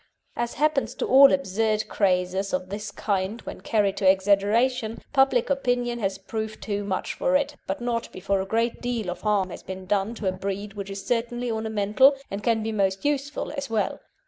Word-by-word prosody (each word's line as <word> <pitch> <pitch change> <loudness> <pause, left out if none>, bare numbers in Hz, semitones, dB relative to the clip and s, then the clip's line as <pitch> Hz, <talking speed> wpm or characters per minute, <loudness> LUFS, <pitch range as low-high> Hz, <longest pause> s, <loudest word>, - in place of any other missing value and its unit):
As 235 0 -2
happens 300 -1 +1
to - - -2
all 275 +1 +8
absurd 215 -4 0
crazes 190 0 0
of 185 0 -2
this 210 +2 -5
kind 200 +1 -2
when - - -8
carried 205 -3 +1
to 190 -2 +4
exaggeration, 215 +5 +2 0.2
public 270 -2 +3
opinion 245 -3 0
has 195 -3 -1
proved 220 +2 -5
too 205 -1 -2
much 190 -2 -2
for 270 - +1
it, 280 0 +1
but 190 +5 -3
not 235 -1 -2
before 195 +1 -1
a 190 - -5
great 230 +3 0
deal 235 -6 -2
of 180 - -7
harm 200 -4 +1
has - - -8
been 190 0 -7
done 205 +3 0
to 210 - -4
a - - +3
breed 195 +2 -4
which 200 -1 -6
is 195 0 -6
certainly 240 0 -1
ornamental, 220 +4 +3 0.2
and 200 +1 -3
can 225 0 +1
be 220 - -2
most 195 -1 0
useful 285 0 -1
as 280 -3 -4
well. 220 -2 -1
215 Hz, 195 wpm, -25 LUFS, 195-240 Hz, 0.2 s, all